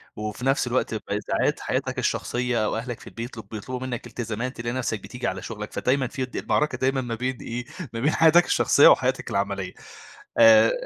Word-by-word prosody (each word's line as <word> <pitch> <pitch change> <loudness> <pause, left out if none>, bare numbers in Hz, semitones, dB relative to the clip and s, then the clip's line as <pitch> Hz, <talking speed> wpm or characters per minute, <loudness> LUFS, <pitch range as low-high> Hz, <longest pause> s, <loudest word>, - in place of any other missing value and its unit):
وفي 105 +3 -5
نفس 135 -2 +2
الوقت 120 -2 0
ب - - -4 0.3
ساعات - - +1
حياتك - - -2
الشخصية 120 -3 0
أو 110 - -1
أهلك 120 0 -5
في - - -14
البيت 115 +1 -6
بيطلب 110 - -9
بيطلبوا 125 +4 -6
منك 120 -2 -5
التزامات، 120 +2 -4
تلاقي 120 +1 -3
نفسك 120 -4 -2
بتيجي 120 +5 -5
على 95 0 -3
شغلك، 105 -2 -7
فدايمًا 130 0 +1
في 130 +1 -3
د 125 - -15
المعركة 150 -4 0
دايمًا 130 +1 +1
ما 120 -2 -3
بين 125 +2 -2
إيه، 120 +1 -5 0.3
ما 115 - -3
بين 145 +5 +2
حياتك 165 +2 +6
الشخصية - - +5
وحياتك - - +3
العملية، - - -2 0.7
آآ 280 - +8
125 Hz, 195 wpm, -25 LUFS, 115-130 Hz, 0.7 s, آآ